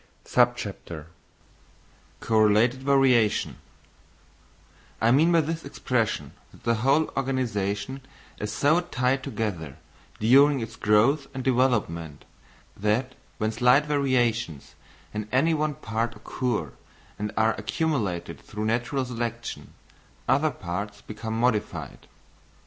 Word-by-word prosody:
Correlated 110 +3 +3
Variation 135 -5 +3 1.4
I 115 +1 +3
mean 155 +7 +5
by 170 -1 +5
this 160 +2 -3
expression 115 - -1 0.2
that - - -19
the 115 - +2
whole 140 +5 +2
organisation 130 -2 -2 0.4
is 105 0 -3
so 145 +9 +3
tied 135 -6 0
together, 105 - -4 0.4
during 135 +5 +5
its 115 -1 -6
growth 120 +8 +3
and 130 - -3
development, 115 - 0 0.5
that 110 +6 0 0.2
when 110 -3 0
slight 125 +5 +4
variations 120 - 0 0.4
in 105 0 -4
any 155 +6 +3
one 155 -1 0
part 115 -1 -3
occur 105 - -3 0.5
and 105 0 -2
are 110 0 +3
accumulated 115 - -2
through 105 +1 -5
natural 120 +4 0
selection, 120 -1 -5 0.5
other 140 +5 +3
parts 100 -2 -5
become 110 +1 -5
modified. 115 -3 -1
120 Hz, 105 wpm, -26 LUFS, 105-135 Hz, 1.4 s, mean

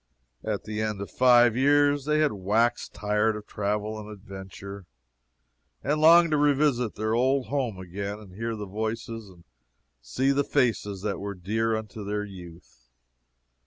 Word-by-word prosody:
At - - -2
the 105 0 -4
end 105 -2 -2
of 100 - -6
five 120 -2 +5
years 145 +1 +3
they 150 0 +2
had 150 - +3
waxed 105 +5 0
tired 105 +1 0
of 105 0 -8
travel 105 +1 -2
and 105 0 -9
adventure, 100 -1 -9 1.0
and 150 +2 0
longed 165 +1 +7
to 150 - +3
revisit 145 -5 +2
their 110 +1 -1
old 130 +2 +1
home 130 -8 -1
again 100 +3 -5
and 105 -4 -14
hear 115 +3 -3
the 105 -1 -5
voices 110 +2 -4
and 90 -2 -17 0.6
see 130 - 0
the 140 +1 +2
faces 110 -9 0
that 105 -2 -2
were 100 0 -5
dear 110 +5 -1
unto 110 0 -6
their 105 +1 -2
youth. 85 -10 -13
110 Hz, 160 wpm, -26 LUFS, 100-125 Hz, 1.0 s, longed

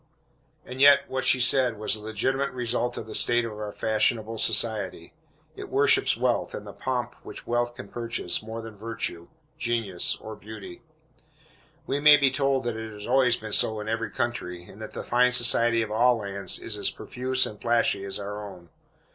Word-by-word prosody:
And 130 +1 -6
yet 140 0 +7
what 130 0 -3
she 130 - +3
said 125 -2 +3
was 105 - 0
the 110 - -3
legitimate 130 +6 -1
result 120 0 -2
of - - -5
the 110 - -9
state 120 0 +3
of 115 - -5
our 105 0 -6
fashionable 110 +1 0
society. 100 -7 -1 0.4
It - - -8
worships - - +3
wealth, - - 0
and - - -7
the - - -9
pomp 125 -2 -3
which - - -10
wealth 120 0 -1
can 100 - -9
purchase, 115 -5 -2
more 110 +1 -7
than 110 -1 -9
virtue, 100 -5 -5 0.3
genius 115 -7 +1
or 110 0 -9
beauty. 105 -4 -10 1.0
We 140 - -1
may 150 0 +8
be 140 -2 +3
told 135 -1 0
that 120 -2 -3
it 110 0 -6
has 105 0 -9
always 125 -1 +3
been 110 -1 -8
so 110 +1 +5
in 105 - -6
every 115 +1 -2
country, 120 -8 -4
and 100 +4 -14
that 110 - -8
the - - -5
fine 125 +1 +2
society 120 -1 +3
of 110 - -7
all 120 +2 +3
lands 100 -3 -1
is - - -2
as - - +1
profuse 130 +1 -2
and 105 - -9
flashy 120 -4 +1
as 100 0 -3
our 105 +1 -6
own. 90 -4 -11
115 Hz, 190 wpm, -26 LUFS, 105-125 Hz, 1.0 s, may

